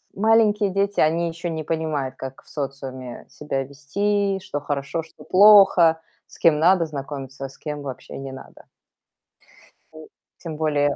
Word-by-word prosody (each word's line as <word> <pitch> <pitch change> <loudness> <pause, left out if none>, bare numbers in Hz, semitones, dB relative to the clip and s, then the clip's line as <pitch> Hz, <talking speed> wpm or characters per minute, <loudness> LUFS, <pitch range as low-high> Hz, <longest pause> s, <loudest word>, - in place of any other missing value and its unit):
маленькие 210 -1 +3
дети, 200 +1 0
они 165 +2 +2
еще 170 +1 -5
не 160 -1 -4
понимают, 155 -4 -2
как 135 0 -9
в - - -22
социуме 135 -3 -6
себя 135 -2 -4
вести, 195 +8 -1
что 145 - -4
хорошо, 145 +3 -3
что 160 - -17
плохо, 190 -5 +6 0.3
с - - -17
кем 160 -3 +4
надо 175 0 +4
знакомиться, 135 -2 -7
а - - -7
с - - -17
кем 150 -2 -6
вообще 130 -3 -8
не 135 -1 -7
надо. 130 - -13 1.3
И 155 0 -12 0.3
тем 165 -3 -7
более 145 -2 +1
155 Hz, 155 wpm, -23 LUFS, 140-185 Hz, 1.3 s, плохо